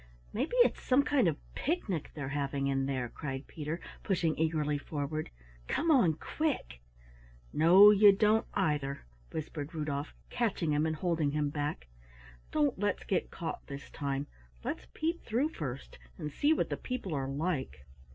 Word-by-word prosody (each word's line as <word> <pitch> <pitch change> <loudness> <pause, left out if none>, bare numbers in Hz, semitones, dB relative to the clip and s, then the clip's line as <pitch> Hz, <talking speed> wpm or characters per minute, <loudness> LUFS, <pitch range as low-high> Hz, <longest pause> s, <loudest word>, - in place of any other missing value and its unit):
"Maybe 270 - -1
it's - - -1
some 260 +2 +4
kind 275 -9 +3
of 155 -3 +1 0.2
picnic 220 - -2
they're 140 -3 -4
having 140 -1 -1
in 135 -1 +1
there," 130 -3 -1
cried 135 +2 -5
Peter, 155 +2 -5 0.2
pushing 170 -5 +1
eagerly 155 -2 0
forward. 155 +1 -3 0.4
"Come 330 +1 +1
on 235 - +5
quick!" 250 - -2 0.7
"No, 185 +6 +8
you 205 0 +8
don't, 215 +2 +3
either," 140 -3 0 0.3
whispered 155 0 -5
Rudolf, 150 -1 -3 0.2
catching 210 -9 0
him 150 +2 +2
and 160 - -1
holding 160 -3 0
him 150 -1 0
back. 145 - -3 0.6
"Don't 295 -8 +1
let's 205 -1 0
get 190 - 0
caught 165 - -5
this 140 0 -8
time, 140 -1 -2 0.4
let's - - -4
peep 330 +2 -1
through 245 +7 +1
first 135 - -6 0.2
and 150 - -4
see 290 - +2
what 320 - +1
the - - -1
people 250 -9 -4
are 135 -2 -1
like." 140 - -2
155 Hz, 155 wpm, -32 LUFS, 140-205 Hz, 0.7 s, No